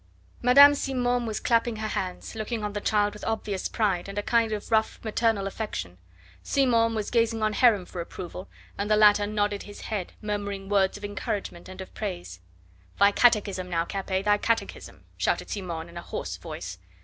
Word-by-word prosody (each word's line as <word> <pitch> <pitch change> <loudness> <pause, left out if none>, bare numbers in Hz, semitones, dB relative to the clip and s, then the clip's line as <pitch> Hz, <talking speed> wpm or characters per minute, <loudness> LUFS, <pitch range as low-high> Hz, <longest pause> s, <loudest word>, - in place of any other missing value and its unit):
Madame 280 +4 +8
Simon 245 -3 0
was 220 - -2
clapping 230 -1 +1
her 215 0 -3
hands, 185 -3 -4
looking 220 0 -3
on 205 -1 -3
the 205 - -3
child 205 -1 +2
with 210 - -11
obvious 210 -4 -2
pride, 195 -4 0
and 195 - -7
a 205 - 0
kind 230 -1 +2
of 215 +1 -4
rough 220 -1 +2
maternal 220 -2 +1
affection. 195 - -5 0.4
Simon 230 - +2
was 215 -2 -3
gazing 230 -2 +1
on 215 0 +1
Heron 210 -6 +4
for 175 - -6
approval, 180 +2 -8 0.3
and 205 +1 -1
the 215 - +5
latter 210 -1 +5
nodded 205 -1 -1
his 205 - -10
head, 200 -5 -4
murmuring 200 -2 -4
words 195 -1 +2
of 205 - -7
encouragement 205 -3 -4
and 185 0 -8
of 190 - -10
praise. 175 - -5 0.6
"Thy 200 0 +6
catechism 200 -5 +2
now, 165 -1 0
Capet 190 0 -2
thy 205 0 +4
catechism," 230 +1 -2
shouted - - -1
Simon 170 -5 -4
in 170 0 -11
a - - -5
hoarse - - -5
voice. 90 +1 -7
205 Hz, 185 wpm, -26 LUFS, 190-225 Hz, 0.6 s, Madame